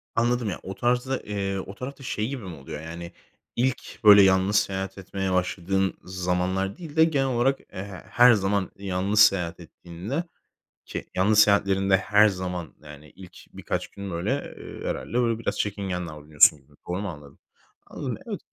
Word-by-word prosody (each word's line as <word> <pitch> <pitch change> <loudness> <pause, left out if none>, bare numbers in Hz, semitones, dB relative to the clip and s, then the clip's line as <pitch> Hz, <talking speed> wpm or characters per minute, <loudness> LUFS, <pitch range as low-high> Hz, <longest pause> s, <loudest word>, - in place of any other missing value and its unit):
Anladım 120 -1 +1
ya, 90 - -4
o 95 - -6
tarzda, 125 +2 0
eee, 100 -1 -3
o 95 +1 -8
tarafta 135 +4 -8
şey 110 -4 -2
gibi 130 -3 -5
mi 90 -3 -7
oluyor 70 +1 -8
yani, 85 +1 -8 0.4
ilk 125 0 -2
böyle 105 -1 +9
yalnız 95 +1 +4
seyahat 95 -2 0
etmeye 95 0 -3
başladığın 95 +1 0
zamanlar 90 +1 -1
değil 160 -4 -9
de 160 - +6
genel 145 -4 +2
olarak 130 +2 +1
e, 95 - -5 0.3
her 125 +1 +7
zaman 100 -2 0
yalnız 100 +2 -1
seyahat 90 -5 +4
ettiğinde, 90 - -6 0.6
ki - - -6
yalnız 105 +3 +4
seyahatlerinde 100 -2 +4
her 105 +3 +4
zaman 90 -4 -4
yani 75 0 -12
ilk 90 -1 -13 0.2
birkaç - - -3
gün 100 -1 -8
böyle, 100 +12 -3
eee, - - -9
herhâlde - - -4
böyle 115 -2 0
biraz - - -3
çekingen 95 -4 -2
davranıyorsun 75 -1 +4
gibi, 70 +2 -26
doğru 90 +2 -2
mu 105 - -3
anladım? 75 -4 -11 0.5
Anladım, - - -5
evet. - - -4
95 Hz, 165 wpm, -25 LUFS, 90-110 Hz, 0.6 s, böyle